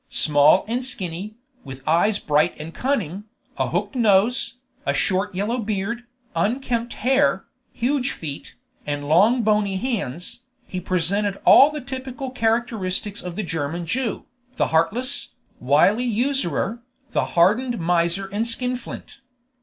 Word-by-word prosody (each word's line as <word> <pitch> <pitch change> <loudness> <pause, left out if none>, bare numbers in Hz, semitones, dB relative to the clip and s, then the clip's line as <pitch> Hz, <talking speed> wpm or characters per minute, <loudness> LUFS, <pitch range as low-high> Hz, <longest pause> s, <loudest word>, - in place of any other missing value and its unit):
Small 150 +4 +4
and 240 +3 -1
skinny, 200 -4 -4 0.3
with 135 -1 -10
eyes 175 +7 +3
bright 150 +1 +1
and 160 +2 -7
cunning, 210 - -2 0.3
a - - +1
hooked - - -2
nose, 230 0 +2 0.3
a - - 0
short 195 0 0
yellow 215 +6 -1
beard, 220 +2 -3 0.3
unkempt 235 +5 -1
hair, 270 +2 +3 0.3
huge 260 +2 0
feet, 145 -3 -7 0.3
and 145 0 -3
long 210 - +4
bony 210 -2 +2
hands, 195 - -3 0.3
he 185 - -5
presented 190 +3 0
all 280 - +8
the 300 -1 -6
typical 260 0 -6
characteristics 225 -4 -1
of 180 -1 -6
the 215 - -2
German 165 0 -3
Jew, 230 +6 -2 0.3
the - - +1
heartless, 245 - +1 0.2
wily 155 - +3
usurer, 235 - -1 0.3
the - - +1
hardened 230 +8 +3
miser 170 +2 +1
and 215 +3 -1
skinflint. 250 +1 -3
205 Hz, 130 wpm, -23 LUFS, 170-245 Hz, 0.3 s, all